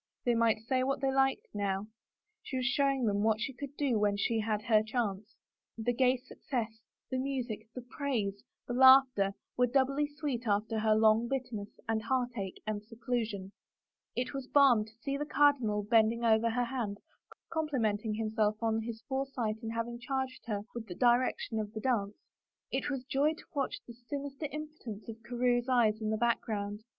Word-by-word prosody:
They 240 Hz, -, +4 dB
might 230 Hz, -2 st, +3 dB
say 255 Hz, +2 st, +1 dB
what 270 Hz, +1 st, 0 dB
they 270 Hz, 0 st, +1 dB
liked 270 Hz, 0 st, +2 dB
now 200 Hz, -1 st, -1 dB, 0.3 s
— 430 Hz, 0 st, -53 dB
she 260 Hz, -, -4 dB
was 255 Hz, -, -1 dB
showing 275 Hz, -1 st, +2 dB
them 205 Hz, -2 st, +1 dB
what 220 Hz, 0 st, +2 dB
she 265 Hz, +5 st, -3 dB
could 280 Hz, +2 st, -8 dB
do 265 Hz, -7 st, +1 dB
when 205 Hz, -1 st, +2 dB
she 225 Hz, +2 st, +1 dB
had 215 Hz, -1 st, -1 dB
her 215 Hz, -1 st, +4 dB
chance! 220 Hz, -2 st, -3 dB, 0.4 s
The 235 Hz, +2 st, 0 dB
gay 255 Hz, +1 st, +3 dB
success, 230 Hz, -3 st, -5 dB, 0.3 s
the 260 Hz, -, 0 dB
music, 250 Hz, -5 st, -3 dB
the 250 Hz, -, -6 dB
praise, 240 Hz, -7 st, -2 dB, 0.2 s
the 245 Hz, -, -4 dB
laughter, 255 Hz, -6 st, +6 dB, 0.2 s
were 250 Hz, 0 st, +4 dB
doubly 275 Hz, +3 st, +2 dB
sweet 290 Hz, -5 st, -4 dB
after 215 Hz, +2 st, +1 dB
her 215 Hz, 0 st, +3 dB
long 220 Hz, +1 st, +4 dB
bitterness 245 Hz, -6 st, -3 dB, 0.2 s
and 225 Hz, -1 st, 0 dB
heartache 235 Hz, -5 st, -2 dB
and 215 Hz, -1 st, -2 dB
seclusion. 225 Hz, -3 st, -3 dB, 0.6 s
It 250 Hz, +2 st, -2 dB
was 270 Hz, -2 st, -5 dB
balm 260 Hz, -7 st, +5 dB
to 220 Hz, 0 st, -18 dB
see 275 Hz, 0 st, -2 dB
the 295 Hz, -, -2 dB
cardinal 255 Hz, -9 st, +3 dB
bending 225 Hz, +2 st, +3 dB
over 225 Hz, 0 st, +4 dB
her 245 Hz, +2 st, 0 dB
hand, 235 Hz, -5 st, -3 dB, 0.5 s
complimenting 230 Hz, -9 st, 0 dB
himself 215 Hz, -1 st, +1 dB
on 225 Hz, -1 st, +1 dB
his 225 Hz, 0 st, -6 dB
foresight 265 Hz, -5 st, -2 dB
in 225 Hz, -, -4 dB
having 230 Hz, +1 st, -3 dB
charged 260 Hz, 0 st, -3 dB
her 205 Hz, -3 st, -1 dB
with 235 Hz, -2 st, -6 dB
the 180 Hz, -, -7 dB
direction 240 Hz, -1 st, +2 dB
of 210 Hz, -1 st, -3 dB
the 220 Hz, -, -4 dB
dance, 210 Hz, -4 st, 0 dB, 0.5 s
it -, -, -1 dB
was 270 Hz, -3 st, -3 dB
joy 285 Hz, +4 st, +1 dB
to -, -, -14 dB
watch 275 Hz, -2 st, -1 dB
the 235 Hz, -, -10 dB
sinister 275 Hz, +5 st, -5 dB
impotence 300 Hz, -9 st, -7 dB
of 225 Hz, 0 st, -8 dB
Carewe's 245 Hz, +1 st, 0 dB
eyes 225 Hz, -4 st, +3 dB
in 215 Hz, -, -1 dB
the 220 Hz, -, 0 dB
background. 210 Hz, -3 st, -1 dB
235 Hz, 180 wpm, -32 LUFS, 215-265 Hz, 0.6 s, laughter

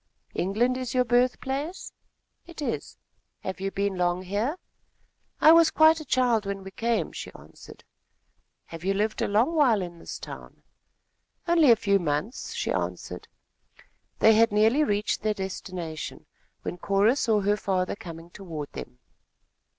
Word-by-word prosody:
"England 235 Hz, +7 st, +1 dB
is 255 Hz, -1 st, -4 dB
your 250 Hz, 0 st, +3 dB
birth 245 Hz, +1 st, +2 dB
place?" 285 Hz, +7 st, -4 dB, 0.5 s
"It 340 Hz, -2 st, -12 dB
is." 290 Hz, -, -4 dB, 0.4 s
"Have 190 Hz, 0 st, -5 dB
you 195 Hz, -, -1 dB
been 200 Hz, -1 st, -2 dB
long 175 Hz, +1 st, +1 dB
here?" 210 Hz, -, -2 dB, 0.8 s
"I 315 Hz, -, +8 dB
was 330 Hz, 0 st, +7 dB
quite 315 Hz, +1 st, +5 dB
a 310 Hz, -, -8 dB
child 245 Hz, -5 st, +2 dB
when 195 Hz, -1 st, -4 dB
I 195 Hz, -, -8 dB
came," 230 Hz, +3 st, -1 dB
she -, -, -7 dB
answered. -, -, -14 dB, 0.8 s
"Have 165 Hz, 0 st, -10 dB
you 195 Hz, +1 st, +1 dB
lived 215 Hz, +2 st, -1 dB
a -, -, +1 dB
long 225 Hz, +10 st, +2 dB
while 265 Hz, -9 st, +4 dB
in 175 Hz, -2 st, -6 dB
this -, -, -7 dB
town?" -, -, -11 dB, 0.8 s
"Only 335 Hz, -4 st, +5 dB
a 235 Hz, -, +8 dB
few 200 Hz, -2 st, +2 dB
months," 165 Hz, -, -3 dB
she -, -, -2 dB
answered. -, -, -4 dB, 0.9 s
They 220 Hz, -, +6 dB
had 230 Hz, +1 st, +4 dB
nearly 220 Hz, +8 st, +4 dB
reached 205 Hz, -5 st, 0 dB
their 215 Hz, 0 st, 0 dB
destination, 180 Hz, -4 st, -6 dB, 0.4 s
when 175 Hz, -, -5 dB
Cora 200 Hz, +6 st, +3 dB
saw 220 Hz, -6 st, +1 dB
her 205 Hz, +1 st, +2 dB
father 185 Hz, -3 st, -1 dB
coming 170 Hz, -4 st, -10 dB
toward 165 Hz, -8 st, -7 dB
them. 60 Hz, -, -8 dB
210 Hz, 155 wpm, -26 LUFS, 190-255 Hz, 0.9 s, I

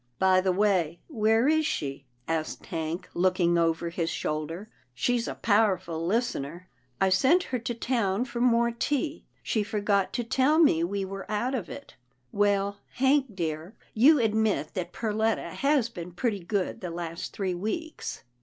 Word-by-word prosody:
By 185 Hz, +2 st, +4 dB
the 190 Hz, 0 st, +1 dB
way, 180 Hz, -4 st, +1 dB
where 225 Hz, -2 st, +2 dB
is 315 Hz, +1 st, +3 dB
she? 140 Hz, -, -3 dB
" -, -, -40 dB
asked 160 Hz, -1 st, -3 dB
Hank, 165 Hz, +2 st, -4 dB
look 185 Hz, +1 st, +1 dB
ing 170 Hz, -1 st, +3 dB
over 165 Hz, 0 st, +1 dB
his 165 Hz, -1 st, -1 dB
shoulder, 160 Hz, +7 st, -3 dB
" 125 Hz, -, -39 dB
she's 235 Hz, -, 0 dB
a -, -, -4 dB
powerful 190 Hz, -6 st, +1 dB
lis 230 Hz, +8 st, +1 dB
tener." 165 Hz, +7 st, -7 dB, 0.2 s
" 125 Hz, -1 st, -41 dB
I 190 Hz, -, +3 dB
sent 265 Hz, -, +4 dB
her 255 Hz, -6 st, -3 dB
to 230 Hz, +1 st, -4 dB
town 230 Hz, -3 st, 0 dB
for 240 Hz, -2 st, -5 dB
more 235 Hz, -1 st, +3 dB
tea. 290 Hz, +6 st, -2 dB, 0.2 s
She 220 Hz, -, 0 dB
forgot 205 Hz, -2 st, 0 dB
to 240 Hz, -, -1 dB
tell 265 Hz, +6 st, +2 dB
me 285 Hz, -, +5 dB
we 195 Hz, +3 st, -1 dB
were 195 Hz, +1 st, -7 dB
out 215 Hz, +5 st, -1 dB
of 220 Hz, -10 st, -3 dB
it 280 Hz, -, -10 dB, 0.2 s
— 125 Hz, 0 st, -44 dB
Well, 200 Hz, 0 st, +1 dB, 0.2 s
Hank 265 Hz, -3 st, +2 dB
dear, 165 Hz, +2 st, -4 dB, 0.2 s
you 280 Hz, +8 st, +6 dB
admit 220 Hz, -, +1 dB
that 175 Hz, -1 st, -4 dB
Perletta 220 Hz, +1 st, -1 dB
has 275 Hz, -4 st, +2 dB
been 180 Hz, -6 st, -8 dB
pretty 210 Hz, +2 st, -1 dB
good 190 Hz, +1 st, -2 dB
the 180 Hz, -, -4 dB
last 170 Hz, 0 st, -5 dB
three 190 Hz, -3 st, -2 dB
weeks." 220 Hz, -, -4 dB
200 Hz, 180 wpm, -27 LUFS, 170-235 Hz, 0.2 s, you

